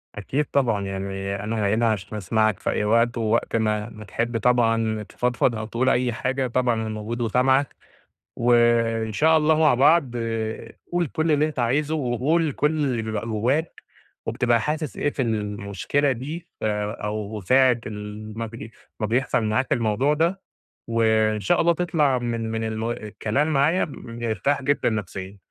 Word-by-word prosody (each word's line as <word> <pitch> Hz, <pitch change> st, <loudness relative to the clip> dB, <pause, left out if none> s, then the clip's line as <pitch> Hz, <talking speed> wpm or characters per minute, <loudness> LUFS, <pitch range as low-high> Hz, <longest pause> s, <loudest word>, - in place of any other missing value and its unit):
أكيد 130 Hz, +9 st, -1 dB
طبعًا 115 Hz, -9 st, 0 dB
يعني 95 Hz, 0 st, -4 dB
أنا 105 Hz, -1 st, 0 dB
هنا 115 Hz, 0 st, +2 dB
عشان 105 Hz, 0 st, -4 dB
أسمعك 110 Hz, +1 st, +1 dB
في -, -, -2 dB
أي -, -, 0 dB
وقت 115 Hz, +3 st, +2 dB
ووقت 115 Hz, +1 st, 0 dB
ما، 110 Hz, 0 st, 0 dB
ما 110 Hz, -1 st, -11 dB
تحب 115 Hz, +4 st, -2 dB
طبعًا 115 Hz, -2 st, +2 dB
تفضفض 125 Hz, +1 st, 0 dB
أو 110 Hz, -, -4 dB
تقول 120 Hz, +4 st, 0 dB
أي 125 Hz, -1 st, +1 dB
حاجة 130 Hz, +3 st, -1 dB
طبعًا 125 Hz, 0 st, +1 dB
أنا 110 Hz, 0 st, -3 dB
موجود 110 Hz, +2 st, -4 dB
وسامعك، 130 Hz, +4 st, +2 dB, 0.6 s
وإن 115 Hz, -2 st, +2 dB
شاء 160 Hz, +7 st, +4 dB
الله 155 Hz, 0 st, +3 dB
مع 155 Hz, -3 st, +5 dB
بعض 140 Hz, +1 st, +4 dB
آآ 115 Hz, -1 st, -3 dB, 0.2 s
قُل 175 Hz, -1 st, +1 dB
كل 160 Hz, +1 st, 0 dB
اللي 150 Hz, +1 st, +3 dB
أنت 150 Hz, -4 st, -6 dB
عايزه 145 Hz, +6 st, +1 dB
وقُل 145 Hz, +5 st, +1 dB
كل 150 Hz, +3 st, +1 dB
اللي 125 Hz, -5 st, 0 dB
بيبقى 110 Hz, 0 st, -3 dB
جواك 125 Hz, +9 st, -1 dB, 0.4 s
وبتبقى 120 Hz, -2 st, +1 dB
حاسس 150 Hz, -2 st, -3 dB
إيه 145 Hz, -, +1 dB
في 140 Hz, -, -3 dB
المشكلة 105 Hz, +4 st, -1 dB
دي 150 Hz, +7 st, -5 dB, 0.2 s
أو 105 Hz, 0 st, -3 dB
ساعة 130 Hz, +5 st, +4 dB
ال 105 Hz, 0 st, -7 dB
ما 115 Hz, -, -2 dB
بي 115 Hz, 0 st, -9 dB, 0.3 s
ما 110 Hz, -, 0 dB
بيحصل 120 Hz, +1 st, +1 dB
معاك 110 Hz, +5 st, +1 dB
الموضوع 120 Hz, +6 st, +1 dB
ده، 170 Hz, +5 st, 0 dB, 0.5 s
وإن 110 Hz, -2 st, +2 dB
شاء 100 Hz, -, +2 dB
الله 170 Hz, 0 st, +4 dB
تطلع 160 Hz, -6 st, +1 dB
من 115 Hz, -2 st, -3 dB
من 110 Hz, 0 st, -2 dB
الم 110 Hz, +1 st, -2 dB
الكلام 110 Hz, +4 st, -2 dB
معايا 150 Hz, +6 st, +3 dB
مرتاح 115 Hz, +3 st, -2 dB
جدًا 145 Hz, -1 st, +1 dB
نفسيًا، 100 Hz, -2 st, -5 dB
115 Hz, 160 wpm, -24 LUFS, 110-135 Hz, 0.6 s, مع